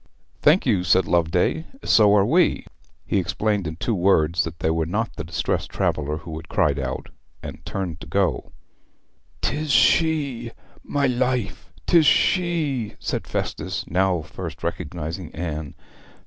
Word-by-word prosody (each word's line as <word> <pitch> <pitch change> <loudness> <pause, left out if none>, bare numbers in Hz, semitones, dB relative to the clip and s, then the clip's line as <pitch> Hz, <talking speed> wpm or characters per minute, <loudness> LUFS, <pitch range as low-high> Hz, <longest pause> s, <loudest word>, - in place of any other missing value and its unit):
'Thank 155 +6 +4
you,' 105 -8 +2
said 90 +1 +3
Loveday; 90 - +1 0.2
'so 105 -2 +5
are 100 -1 +4
we.' - - +2 0.4
He - - +1
explained 100 +1 -1
in 80 - -5
two 115 +7 -2
words 85 -4 +3
that 80 0 -7
they 80 - 0
were 80 -1 0
not 110 +6 -2
the - - -5
distressed 85 +2 -2
traveller 75 0 -1
who 80 0 -8
had 80 - -10
cried 70 -2 +1
out, 65 -1 -4 0.3
and - - -8
turned 90 -4 -4
to - - -9
go 95 0 +1
on. - - -23 0.9
''Tis 155 +1 -1
she! 140 -6 +3 0.3
my 140 -1 -1
life, 125 -5 -1
'tis 165 -4 +5
she 155 - +1
said - - -4
Festus, - - -3
now 90 -1 +1
first 85 0 -8
recognizing 85 0 -4
Anne. 80 -3 -4
95 Hz, 150 wpm, -23 LUFS, 80-120 Hz, 0.9 s, so